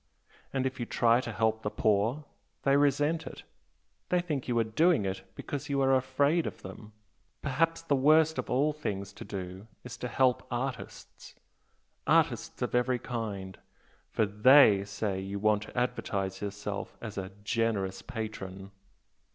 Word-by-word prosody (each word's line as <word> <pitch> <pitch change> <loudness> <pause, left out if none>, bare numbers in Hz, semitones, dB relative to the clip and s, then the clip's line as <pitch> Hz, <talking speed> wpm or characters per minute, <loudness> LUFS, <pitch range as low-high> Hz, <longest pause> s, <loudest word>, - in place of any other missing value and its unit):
And 135 -1 -1
if 130 0 -3
you 120 - -3
try 120 +1 +3
to 115 - -5
help 110 +1 0
the 105 - -2
poor 110 +9 +1 0.4
they 140 0 +4
resent 145 +3 +2
it - - -9 0.7
they 180 - +3
think 155 -7 -3
you 120 -2 0
are 115 - +4
doing 140 - +2
it 95 0 -3
because 145 +1 -5
you 140 -1 +1
are 135 0 +4
afraid 140 +5 +2
of - - -8
them! 105 +3 -10 0.5
Perhaps 165 +4 0
the 145 -4 +2
worst 155 +3 +4
of - - -4
all 145 +5 +2
things 100 -9 -4
to - - -9
do 95 +1 -7 0.2
is 125 - -8
to 125 - -4
help 125 +1 +2
artists 125 +1 -6 0.7
artists - - +2
of - - -2
every 125 +1 +2
kind! 105 -6 -5 0.5
for 110 - +1
THEY 105 0 +6
say 100 -1 -3
you 95 +1 -4
want 105 0 +2
to 110 - -10
advertise 95 -6 -2
yourself 100 0 -5
as 110 -3 -7
a 95 -1 -5
'generous 105 -4 -1
patron'! 100 -3 -6
115 Hz, 160 wpm, -30 LUFS, 100-135 Hz, 0.7 s, THEY